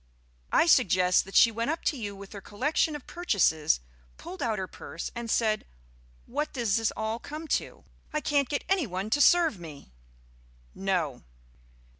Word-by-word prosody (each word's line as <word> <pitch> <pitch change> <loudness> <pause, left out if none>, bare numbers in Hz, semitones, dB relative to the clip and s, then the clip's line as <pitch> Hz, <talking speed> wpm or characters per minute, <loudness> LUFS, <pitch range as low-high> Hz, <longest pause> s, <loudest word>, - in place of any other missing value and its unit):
I - - +5
suggest 185 - +4
that 195 - -11
she 230 - +7
went 230 +4 -2
up 320 +1 -2
to 305 - +1
you 205 -6 -5
with 195 +1 -11
her 200 - -8
collection 295 +10 0
of 295 - -8
purchases, 175 - +1 0.4
pulled 185 - -9
out 225 -3 0
her 190 - -2
purse, 170 - -7
and 235 -1 -6
said, 220 -2 +1 0.6
'What 295 +4 -3
does 225 -3 +1
all 220 +1 -2
this - - -12
come 310 +2 -6
to? - - -13 0.3
I 305 - 0
can't 285 -2 +1
get 285 - -1
any 380 -8 +1
one 190 +3 -4
to 290 - +3
serve 330 - +5
me.'" 150 - -11 0.8
"No." 180 -9 -1
225 Hz, 170 wpm, -28 LUFS, 190-290 Hz, 0.8 s, she